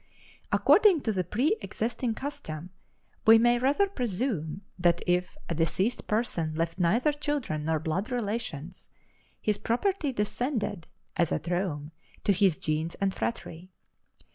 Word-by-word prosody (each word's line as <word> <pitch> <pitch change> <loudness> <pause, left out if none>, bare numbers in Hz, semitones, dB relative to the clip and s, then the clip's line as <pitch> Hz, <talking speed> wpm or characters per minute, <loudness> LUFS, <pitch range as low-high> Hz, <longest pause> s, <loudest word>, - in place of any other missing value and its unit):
According 405 -8 +5
to 225 - 0
the 185 -2 0
preëxisting 240 - -1
custom, 180 - -6 0.6
we 225 +1 +10
may 240 +1 +4
rather 285 +11 +3
presume 215 - -2 0.2
that 175 -1 +3
if 180 +8 0
a - - -2
deceased 185 +8 0
person 175 -8 0
left 165 +2 -2
neither 230 - +3
children 290 - -2
nor 160 0 +2
blood 180 - -2
relations, 205 - -4 0.5
his 210 -1 0
property 305 - 0
descended 215 - -2 0.3
(as 170 -3 +2
at - - -2
Rome) 170 -5 -2 0.3
to 200 - +4
his 190 -4 +3
gens 155 +2 -2
and 195 -1 0
phratry. 185 -6 -4
200 Hz, 130 wpm, -28 LUFS, 170-245 Hz, 0.6 s, we